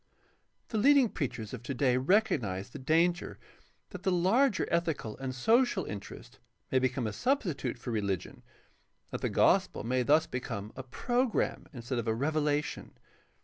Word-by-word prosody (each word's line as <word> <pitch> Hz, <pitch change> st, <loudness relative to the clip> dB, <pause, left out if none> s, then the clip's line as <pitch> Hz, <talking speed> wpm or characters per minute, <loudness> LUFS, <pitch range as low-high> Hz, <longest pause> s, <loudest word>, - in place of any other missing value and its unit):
— -, -, -44 dB
^The 220 Hz, -3 st, 0 dB
lead 285 Hz, +4 st, +6 dB
ing 255 Hz, -5 st, +4 dB
preachers 115 Hz, -, -4 dB
of 125 Hz, -, -6 dB
today 125 Hz, 0 st, +1 dB
recognize 125 Hz, -, +1 dB
the -, -, -8 dB
danger 165 Hz, +6 st, +1 dB, 0.5 s
that 185 Hz, -3 st, -8 dB
the 190 Hz, 0 st, +1 dB
larger 195 Hz, +7 st, +2 dB
ethical 160 Hz, -10 st, -1 dB
and 130 Hz, -1 st, -4 dB
social 225 Hz, -, +2 dB
interest 100 Hz, -2 st, -9 dB, 0.3 s
may 130 Hz, -, +4 dB
become 130 Hz, -1 st, 0 dB
a 110 Hz, -, -2 dB
substitute 175 Hz, -, -1 dB
for 120 Hz, +1 st, -6 dB
reli 100 Hz, -4 st, 0 dB
gion, -, -, -11 dB
and -, -, -19 dB, 0.7 s
that -, -, -4 dB
the -, -, 0 dB
gospel -, -, +2 dB
may 125 Hz, +3 st, 0 dB
thus 150 Hz, +6 st, +4 dB
become 110 Hz, -6 st, -5 dB
a 130 Hz, -, -5 dB
program 240 Hz, -, -1 dB
instead 125 Hz, -2 st, -4 dB
of 115 Hz, -, -4 dB
a 110 Hz, -, +1 dB
revelation. 150 Hz, +2 st, -1 dB
140 Hz, 165 wpm, -30 LUFS, 120-185 Hz, 0.7 s, lead